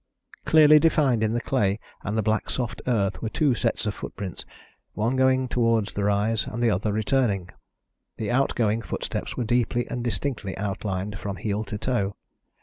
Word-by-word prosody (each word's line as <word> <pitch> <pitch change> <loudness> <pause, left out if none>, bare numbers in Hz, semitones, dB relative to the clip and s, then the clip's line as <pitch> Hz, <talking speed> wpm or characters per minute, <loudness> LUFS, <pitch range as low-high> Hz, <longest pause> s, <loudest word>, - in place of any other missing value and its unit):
Clearly 155 -1 +7
defined 145 -7 +3
in 110 0 +1
the 120 - +1
clay 105 -6 +1 0.2
and 105 +2 -3
the 110 - +1
black 110 +1 0
soft 115 -3 -3
earth 100 -6 0
were 115 - -2
two 145 +2 +2
sets 115 -2 -1
of 105 - -1
footprints, 95 -5 -7 0.5
one 115 +5 0
going 130 0 +3
towards 115 -3 +1
the 100 - -2
rise, 105 +2 +1
and 120 +2 -3
the 115 - +4
other 105 +2 0
returning. 105 -4 0 0.7
The 105 -2 -2
outgoing 115 -4 +1
footsteps - - -4
were 125 - 0
deeply 120 +1 +1
and 125 -1 -3
distinctly 120 -4 -3
outlined 100 0 -3
from 100 -1 -4
heel 105 +3 -2
to 105 - -5
toe. 105 -4 -1
110 Hz, 170 wpm, -25 LUFS, 105-125 Hz, 0.7 s, Clearly